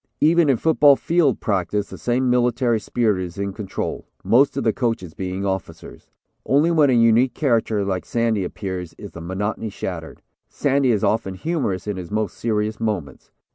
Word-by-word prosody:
Even 165 0 +4
in 130 - +3
football 145 0 +5
field 160 -3 +1
practice 100 0 -1
the - - -7
same 125 +2 0
military 125 -1 +2
spirit 105 -4 0
is 90 0 -8
in 100 0 -3
control, 100 -2 -5 0.2
most 120 +8 +3
of - - -1
the 110 -2 +2
coaches 115 -9 -2
being 95 +2 -4
officers. 95 -3 -5 0.3
Only 150 +5 +3
when 155 -4 +4
a - - +3
unique 115 +2 +4
character 115 -7 +1
like 95 -2 -2
Sandy 115 -4 0
appears 90 -2 -5
is - - -9
the 85 - -9
monotony 105 +5 -3
shattered. 90 -5 -7 0.3
Sandy 140 -2 +1
is 105 -3 0
often 105 -3 0
humorous 105 - -2
in 105 -2 -3
his 90 -2 -7
most 110 0 -2
serious 110 -1 -1
moments. 105 -11 -4
110 Hz, 175 wpm, -22 LUFS, 95-125 Hz, 0.3 s, football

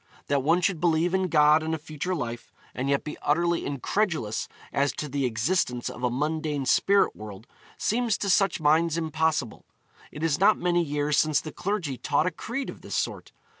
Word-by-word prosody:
That 140 -1 +2
one 165 +6 +2
should 180 -4 0
believe 170 +1 +2
in 190 -1 +1
God 150 -1 +5
and 160 +1 -1
a - - -4
future 155 +4 -4
life, 120 -6 -5 0.2
and 130 +2 -3
yet 140 0 +1
be 150 - -6
utterly 170 +3 +1
incredulous 140 - -1 0.3
as 140 +1 +1
to 150 - -4
the 140 -1 -1
existence 125 +1 0
of 120 - -10
a 125 - +2
mundane 150 +2 -2
spirit 195 +10 +3
world, 105 0 -10 0.3
seems 230 -1 0
to 200 - -2
such 195 0 +2
minds 160 +2 +3
impossible. 160 -6 -1 0.5
It 150 - -7
is 160 -3 +1
not 205 +3 +5
many 175 -1 +1
years 145 -1 0
since 155 -2 +3
the 155 - -7
clergy 175 - -3
taught 145 +6 +1
a 180 - +1
creed 240 +10 -5
of - - -14
this - - -6
sort. - - -3
155 Hz, 190 wpm, -26 LUFS, 140-175 Hz, 0.5 s, God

